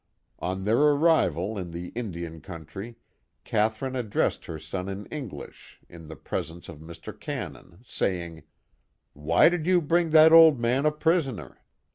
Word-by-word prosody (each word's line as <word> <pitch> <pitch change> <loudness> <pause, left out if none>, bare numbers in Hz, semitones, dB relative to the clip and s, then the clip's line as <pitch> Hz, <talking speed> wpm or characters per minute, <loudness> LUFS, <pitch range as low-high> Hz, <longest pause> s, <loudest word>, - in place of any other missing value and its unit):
On 95 +2 -3
their 110 +4 +2
arrival 145 - +2
in 90 -2 -6
the 85 +1 -7
Indian 85 -8 -6
country, 95 +6 -9 0.5
Catherine 110 +5 -1
addressed 115 -5 -1
her 80 - -6
son 90 +5 -6
in 100 +1 -6
English 140 -9 -9
in 80 -2 -13
the 80 - -9
pres 70 - -4
ence 85 +1 -13
of 75 - -10
Mr. 80 +1 -10
Cannon, 85 - -7
saying: 85 -7 -3 0.4
" - - -48 0.2
Why 75 +3 +4
did 170 -1 0
you 185 -1 +4
bring 170 +1 +1
that 160 +1 +7
old 160 -5 +8
man 125 +5 +1
a - - +3
prisoner 150 - -1
105 Hz, 155 wpm, -26 LUFS, -, 0.5 s, old